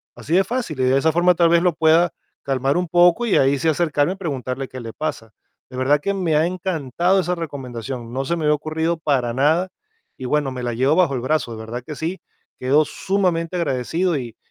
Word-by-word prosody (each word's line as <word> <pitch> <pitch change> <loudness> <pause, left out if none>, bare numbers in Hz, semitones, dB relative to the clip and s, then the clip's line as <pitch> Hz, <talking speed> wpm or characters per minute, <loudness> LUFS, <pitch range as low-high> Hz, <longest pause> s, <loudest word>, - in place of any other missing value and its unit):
Así 120 +7 -5
de 190 - +5
fácil. 230 - -4
Y - - +2
de 130 +1 +3
esa 160 +3 +2
forma 175 +2 +4
tal 170 -1 +3
vez 170 0 +4
lo 180 -3 +3
pueda 165 +2 +3 0.3
calmar 135 +1 0
un 180 -1 -1
poco 175 +7 +4
y 225 - +2
ahí 135 +1 +3
sí 150 +4 -1
acercarme 155 0 +1
y - - -10
preguntarle 135 -7 -4
qué 130 - -9
le 115 -2 -7
pasa. 115 -8 -5 0.4
De 125 - -8
verdad 140 +3 +2
que 200 +7 -1
me 180 -5 0
ha 155 +2 +3
encantado 175 0 0
esa 180 0 -1
recomendación, 130 -7 -6
no 135 +1 -1
se 170 - 0
me 165 - -4
había 150 - +4
ocurrido 160 +2 -2
para 135 -7 0
nada 155 +8 +2 0.5
y 130 - -8
bueno, 140 +1 0
me 130 - -6
la 120 -1 -2
llevo 135 +6 +2
bajo 170 -7 +3
el 125 - -3
brazo, 130 -3 -1
de - - -8
verdad 110 +2 -6
que 150 +3 -7
sí. 170 +6 -4 0.4
Quedo 140 +4 +3
sumamente 180 -2 -1
agradecido 165 +2 0
y 120 -3 -6
155 Hz, 225 wpm, -21 LUFS, 130-175 Hz, 0.5 s, de